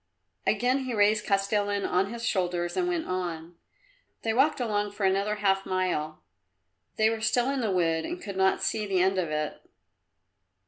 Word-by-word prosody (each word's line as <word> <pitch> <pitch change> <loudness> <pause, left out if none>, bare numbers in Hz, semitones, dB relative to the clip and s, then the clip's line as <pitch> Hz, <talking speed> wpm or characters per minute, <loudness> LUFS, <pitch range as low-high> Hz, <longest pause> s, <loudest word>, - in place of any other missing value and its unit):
Again 260 +2 +2
he 250 -2 -3
raised 210 +1 +3
Kostilin 200 0 +1
on 185 +2 +2
to 205 - -7
his 235 0 -5
shoulders 175 -5 -1
and 360 -1 +1
went 345 -2 -1
on. 175 -2 -4 0.7
They 225 - 0
walked 270 +5 +3
along 205 -4 -1
for 205 -1 -2
another 200 +2 +1
half 195 -2 +1
mile. 180 -5 -2 0.7
They 220 0 +4
were 225 -1 -3
still 240 +4 +2
in 275 -2 -1
the 220 - 0
wood 165 -3 +1
and 350 +1 -5
could 200 - -7
not 190 0 +2
see 215 -2 -1
the 190 -2 +1
end 190 +1 +2
of 170 -3 -1
it. 150 0 -3
200 Hz, 180 wpm, -27 LUFS, 185-225 Hz, 0.7 s, They